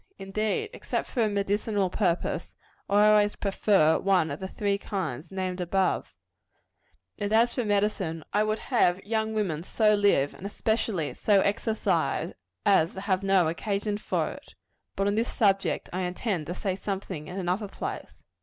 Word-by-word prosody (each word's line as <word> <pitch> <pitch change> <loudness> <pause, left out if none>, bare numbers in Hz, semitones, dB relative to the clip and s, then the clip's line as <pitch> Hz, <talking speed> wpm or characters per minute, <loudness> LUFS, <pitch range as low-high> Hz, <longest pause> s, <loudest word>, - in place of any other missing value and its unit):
Indeed, 215 - -2
except - - -3
for 245 - -1
a 220 - +3
medicinal 205 -1 0
purpose, 180 -5 -1 0.3
I 205 +1 +5
always 210 -1 +4
prefer 195 -5 +3
one 190 -4 +2
of - - -5
the 190 - -4
three 200 +1 -1
kinds 165 - -4
named 185 -1 -3
above. 185 +2 0 1.0
And 205 0 -2
as 230 +2 +4
for 250 - -1
medicine, 200 -6 0
I 210 - +3
would 215 0 0
have 190 -8 +1
young 220 0 -1
women 180 -8 -1
so 210 +4 +2
live, 200 -9 +3
and - - -13
especially 210 -6 -1
so 200 -2 +3
exercise, 215 +2 0 0.3
as 190 -5 +4
to 190 - -6
have 190 -2 0
no 195 -3 +3
occasion 205 +5 -2
for - - -1
it. - - -13 0.4
But 195 - 0
on 205 - +2
this 225 +3 0
subject 195 -3 +1
I 185 - -1
intend 180 -2 -2
to 175 - -4
say 190 -2 -2
something 190 -6 -5
in 180 - -7
another 190 +3 -1
place. - - -7
200 Hz, 165 wpm, -27 LUFS, 185-210 Hz, 1.0 s, I